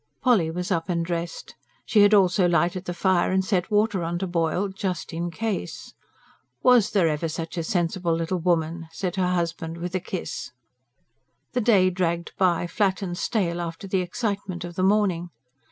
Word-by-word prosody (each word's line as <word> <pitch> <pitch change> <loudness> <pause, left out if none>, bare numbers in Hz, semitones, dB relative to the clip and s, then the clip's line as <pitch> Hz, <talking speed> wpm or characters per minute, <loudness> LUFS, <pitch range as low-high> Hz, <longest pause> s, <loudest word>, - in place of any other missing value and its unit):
Polly 220 -11 +4
was 180 +3 -4
up 165 -1 -1
and 170 -1 0
dressed. 170 -1 -4 0.3
She 215 - +4
had 205 0 +6
also 190 -2 +4
lighted 175 +2 +1
the 175 - -3
fire 185 -1 +2
and 190 0 +1
set 185 -2 0
water 210 -2 +2
on 170 +1 -2
to 190 - -2
boil, 175 +2 0
"just 190 -3 -4
in 170 +1 -2
case." 215 +3 -4 0.7
"Was 250 -5 +5
there 195 -6 +3
ever 155 +1 -1
such 165 +2 -5
a 170 - -2
sensible 175 0 0
little 165 +2 -1
woman?" 165 -1 0
said 180 +1 -3
her 185 -1 +2
husband 165 -1 -2
with 175 +1 -5
a 185 - +1
kiss. 175 -7 -5 1.0
The 250 - 0
day 195 -5 +4
dragged 170 -2 -1
by, 175 -3 +2
flat 190 +2 0
and 175 -2 -3
stale 175 -4 -1
after 170 +3 -6
the 190 -1 +1
excitement 195 -2 -3
of 175 0 -6
the 185 - -3
morning. 190 -3 +2
180 Hz, 180 wpm, -25 LUFS, 170-195 Hz, 1.0 s, had